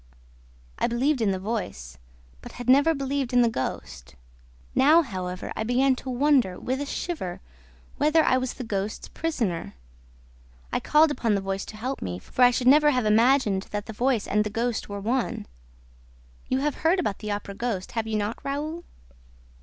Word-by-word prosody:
I - - +2
believed 255 +3 +1
in 215 - +2
the 190 - 0
voice, 180 - -5 0.4
but - - -11
had 245 -1 -8
never 285 +5 +5
believed 275 -2 -2
in 245 0 +5
the - - +4
ghost. 60 - -5 0.6
Now, 315 +5 +5
however, 185 - -5
I - - -3
began 255 +3 +2
to 260 - -7
wonder, 255 -7 +2
with 260 +2 -2
a 285 - -3
shiver, 280 - -4 0.6
whether 305 +2 +4
I 255 - +3
was 255 -1 -3
the 255 - -6
ghost's 210 -1 -4
prisoner. 225 - -3 1.0
I - - +2
called 300 +1 +4
upon 230 -6 0
the - - +1
voice 195 0 -3
to 215 - -10
help 255 +5 -4
me, 90 -1 -4
for 95 - -5
I 245 - +9
should 245 0 -1
never 295 +3 +6
have 250 -5 +1
imagined 215 -2 +3
that 205 0 -4
the 220 - -7
voice 240 -1 +1
and 210 +1 +2
the 210 - -3
ghost 230 +1 -2
were 200 0 -5
one. 235 +5 -1 1.0
You 260 +1 0
have 295 -1 -1
heard 335 +4 +3
about 210 - -2
the 215 - -6
Opera 205 -1 -5
ghost, 200 -3 -3
have 225 -2 -2
you 220 -1 -1
not, 210 +2 -2
Raoul?" 305 +5 -3
240 Hz, 185 wpm, -25 LUFS, 205-275 Hz, 1.0 s, I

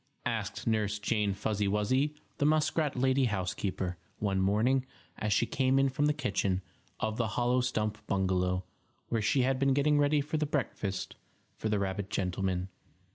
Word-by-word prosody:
asked 105 -3 -2
Nurse 105 -2 +1
Jane 105 -2 0
Fuzzy 105 0 -1
Wuzzy, 130 +9 +1 0.2
the 145 - +2
muskrat 155 -1 +2
lady 130 +1 +3
housekeeper, 95 -3 -2 0.2
one 95 -2 0
morning, 110 +7 +3 0.4
as 105 - -1
she 110 - +3
came 130 +2 +2
in 135 0 +4
from 145 +3 +1
the - - +4
kitchen 95 -7 0 0.4
of 110 0 -1
the 115 - +1
hollow 125 +1 +3
stump 110 -4 -1
bungalow, 95 -1 +1 0.5
where 115 -2 +1
she 125 +5 +3
had 130 0 +1
been 135 -1 +3
getting 145 +1 +3
ready 145 +1 +3
the 150 +2 -1
breakfast 110 -9 -2 0.4
for 110 - -3
the 105 - +2
rabbit 100 0 -2
gentleman. 95 -2 -1
110 Hz, 160 wpm, -31 LUFS, 100-135 Hz, 0.5 s, in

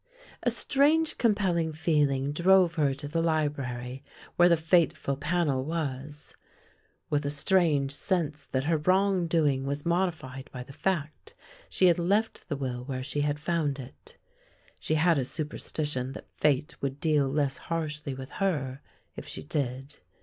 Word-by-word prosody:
A - - +2
strange 305 +3 +2
compelling 190 -8 +2
feeling 145 -4 +1
drove 180 +2 +4
her 150 -4 +2
to 145 +1 -7
the 165 +3 -1
library 140 -5 -2 0.3
where 175 0 +6
the 170 - +5
fateful 160 -3 +2
panel 150 -2 0
was. 145 -2 -5 0.8
With 145 0 +1
a 145 - -1
strange 150 -3 +2
sense 155 -2 -1
that 130 0 -1
her 160 +2 +2
wrong 185 +2 +2
doing 150 -5 +2
was 140 +1 -3
modified 160 -7 -1
by 125 -1 -6
the 135 - -13
fact, 185 - -3 0.3
she 185 - +2
had 175 -1 +5
left 200 +3 0
the 145 - -2
will 125 -3 -3
where 130 -1 -4
she 140 +2 -2
had 145 0 0
found 155 -3 0
it. 140 - -12 0.6
She 155 - -1
had 165 -1 +3
a - - 0
super 150 +4 -4
stition 135 -4 -3
that - - -12
fate 150 +2 0
would 140 0 -3
deal 150 -3 +2
less 140 -1 0
harshly 150 -4 -3
with 130 0 -8
her, 145 -9 -1 0.3
if - - -8
she - - -7
did. 135 - -3
150 Hz, 155 wpm, -28 LUFS, 135-170 Hz, 0.8 s, where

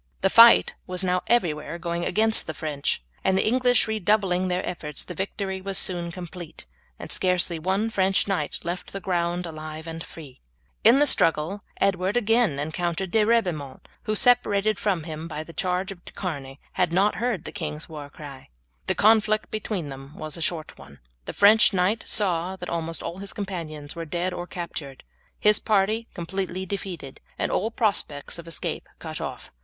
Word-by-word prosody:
The 195 0 +3
fight 230 0 +8
was 180 +1 -2
now 180 0 +1
everywhere 165 -8 +1
going 170 0 -3
against 220 +1 +4
the 160 - -4
French, 145 - -2 0.2
and 190 - +3
the - - +2
English 245 +1 +3
redoubling 200 -3 +1
their 180 +1 -1
efforts 150 -5 -4
the 180 - -7
victory 190 +1 -3
was 195 0 -2
soon 175 -2 -1
complete, 175 -2 -8 0.3
and - - -8
scarcely 180 -2 +1
one 195 +7 0
French 195 -2 +2
knight 180 -7 -1
left 175 +2 -5
the 195 - -3
ground 175 -1 -1
alive 155 -1 -7
and 165 0 -6
free. 145 -6 -12 0.4
In 230 +5 +7
the 290 - +5
struggle 170 - +2 0.2
Edward 195 +2 +1
again 225 - +3
encountered 170 +4 -2
De 220 +1 +4
Ribaumont, 180 - 0 0.2
who, 215 0 0
separated 215 -3 +3
from 190 -6 0
him 160 0 -6
by 155 -1 -5
the 165 - -12
charge 185 +2 -1
of 175 -2 -11
De - - -11
Charny, 140 -7 -5
had 175 -2 +1
not 195 +4 +2
heard 235 -7 -1
the - - -7
king's 155 -5 -5
war 150 -3 -8
cry. 140 -3 -11 0.4
The - - +1
conflict 215 0 +3
between 210 -7 -3
them 135 +2 -10
was 155 -1 -5
a 170 - -4
short 160 -1 -2
one. 70 0 -13 0.3
The - - -5
French 215 +2 +6
knight 190 +4 +1
saw 185 -2 +1
that 180 -1 -7
almost 165 -1 -3
all 175 - -5
his 200 0 -6
companions 165 -8 -5
were 165 0 -5
dead 175 +3 -2
or 175 0 -5
captured, 155 -7 -6 0.4
his 210 0 +4
party 215 +2 +1
completely 185 +1 -3
defeated, 180 -8 -6 0.2
and - - -1
all 215 - +1
prospects 200 - -1
of 170 - -10
escape 165 - -3
cut - - -6
off. - - -6
180 Hz, 180 wpm, -25 LUFS, 160-200 Hz, 0.4 s, fight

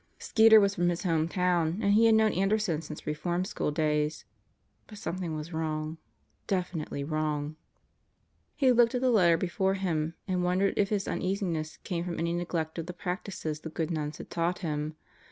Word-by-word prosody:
Skeeter 220 0 +6
was 200 -1 +3
from 175 -2 +1
his 175 +2 -2
home 165 -3 +1
town 175 -2 +1
and 200 -2 +2
he 225 +2 +6
had 225 - +6
known 220 -1 +4
Anderson 195 -4 +1
since 155 -1 -9
re 150 - -1
form 175 +4 -1
school 210 -6 -2
days. 150 0 0 0.6
But 210 - -11
something 180 -5 -4
was 155 +2 -6
wrong. 155 0 -3 0.5
Definitely 175 -6 -2
wrong. 150 0 -2 1.0
He 265 -4 +4
looked 240 0 +4
at 250 - 0
the 255 -1 +3
letter 175 -7 +5
before 190 +2 0
him 165 -4 -1
and 180 -2 0
wondered 185 +2 +2
if 200 -1 +2
his 205 -2 -1
un - - -2
easiness 180 -5 -2
came 170 -2 -2
from 175 -1 -4
any 170 +1 -1
neglect 170 -2 -2
of 165 - -5
the 180 - -5
practices 180 -3 -4
the 160 - -7
good 160 +1 -3
nuns 150 -2 -3
had - - -10
taught 170 +1 0
him. 150 0 -2
175 Hz, 190 wpm, -29 LUFS, 155-195 Hz, 1.0 s, Skeeter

